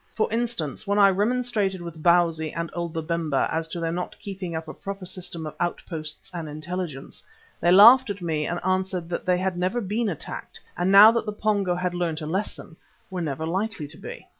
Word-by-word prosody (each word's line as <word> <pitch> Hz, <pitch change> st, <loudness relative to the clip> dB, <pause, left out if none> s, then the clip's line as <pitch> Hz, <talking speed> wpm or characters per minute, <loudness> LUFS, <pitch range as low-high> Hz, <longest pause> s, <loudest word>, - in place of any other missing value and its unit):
For 220 Hz, -, 0 dB
instance, 225 Hz, -, -2 dB
when 200 Hz, +1 st, +1 dB
I 200 Hz, -1 st, +7 dB
remonstrated 210 Hz, -2 st, 0 dB
with 170 Hz, -2 st, -8 dB
Bausi 165 Hz, -2 st, +3 dB
and 170 Hz, -1 st, -4 dB
old 170 Hz, -1 st, -3 dB
Babemba 160 Hz, -3 st, -1 dB
as 160 Hz, 0 st, -1 dB
to 170 Hz, +1 st, -5 dB
their 165 Hz, -1 st, -1 dB
not 180 Hz, +1 st, -4 dB
keeping 190 Hz, -4 st, -6 dB
up 160 Hz, 0 st, -4 dB
a -, -, -6 dB
proper 195 Hz, -1 st, -7 dB
system 175 Hz, -3 st, -5 dB
of 155 Hz, -, -6 dB
outposts 160 Hz, -3 st, -4 dB
and 165 Hz, -3 st, -5 dB
intelligence, 155 Hz, -1 st, -6 dB, 0.4 s
they 175 Hz, -, +2 dB
laughed 230 Hz, +7 st, +8 dB
at 200 Hz, 0 st, -3 dB
me 160 Hz, -4 st, -1 dB
and 175 Hz, -, -2 dB
answered 185 Hz, -2 st, -1 dB
that 175 Hz, -, -4 dB
they 180 Hz, -1 st, +3 dB
never 185 Hz, +6 st, -1 dB
had 210 Hz, -, -5 dB
been 215 Hz, +2 st, 0 dB
attacked 165 Hz, -, -7 dB, 0.2 s
and 180 Hz, +2 st, +1 dB
now 205 Hz, +3 st, +10 dB
that 230 Hz, -1 st, -1 dB
the -, -, 0 dB
Pongo 205 Hz, -3 st, 0 dB
had 180 Hz, 0 st, -2 dB
learnt 170 Hz, -3 st, -1 dB
a -, -, -4 dB
lesson, 175 Hz, -1 st, -4 dB, 0.3 s
were 185 Hz, -1 st, -3 dB
never 155 Hz, -1 st, -3 dB
likely 190 Hz, -1 st, -2 dB
to -, -, -13 dB
be. -, -, -9 dB
180 Hz, 205 wpm, -25 LUFS, 165-200 Hz, 0.4 s, now